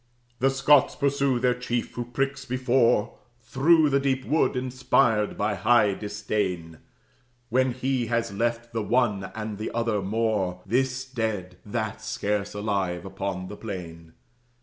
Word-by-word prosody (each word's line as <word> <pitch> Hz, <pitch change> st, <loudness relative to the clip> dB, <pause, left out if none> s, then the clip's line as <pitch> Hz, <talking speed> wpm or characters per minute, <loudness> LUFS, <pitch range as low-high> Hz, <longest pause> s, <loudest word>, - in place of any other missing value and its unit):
The 135 Hz, +2 st, +4 dB
Scots 135 Hz, +1 st, +4 dB
pursue 140 Hz, -2 st, +1 dB
their 125 Hz, 0 st, +2 dB
chief, 120 Hz, -1 st, -3 dB
who 120 Hz, -, -4 dB
pricks 135 Hz, +2 st, -2 dB
before, 125 Hz, -3 st, +1 dB, 0.2 s
Through 150 Hz, +5 st, +3 dB
the 140 Hz, -, +4 dB
deep 135 Hz, -1 st, 0 dB
wood, 155 Hz, -2 st, +2 dB
inspired 125 Hz, -4 st, +1 dB
by 105 Hz, +1 st, 0 dB
high 105 Hz, +1 st, +3 dB
disdain, 105 Hz, -5 st, -3 dB, 0.7 s
When 130 Hz, +1 st, +2 dB
he 130 Hz, -1 st, -1 dB
has 115 Hz, -3 st, -1 dB
left 120 Hz, +2 st, -2 dB
the 115 Hz, -, -1 dB
one 105 Hz, -4 st, +1 dB
and 110 Hz, -2 st, -5 dB
the 110 Hz, -, -3 dB
other 115 Hz, -3 st, 0 dB
Moor, 100 Hz, -3 st, -1 dB
This 125 Hz, +4 st, 0 dB
dead, 110 Hz, -8 st, -3 dB
that 110 Hz, 0 st, -3 dB
scarce 105 Hz, -2 st, -2 dB
alive, 100 Hz, -4 st, -1 dB
upon 95 Hz, -1 st, -4 dB
the 105 Hz, -, -7 dB
plain. 85 Hz, -6 st, -8 dB
115 Hz, 140 wpm, -26 LUFS, 100-130 Hz, 0.7 s, The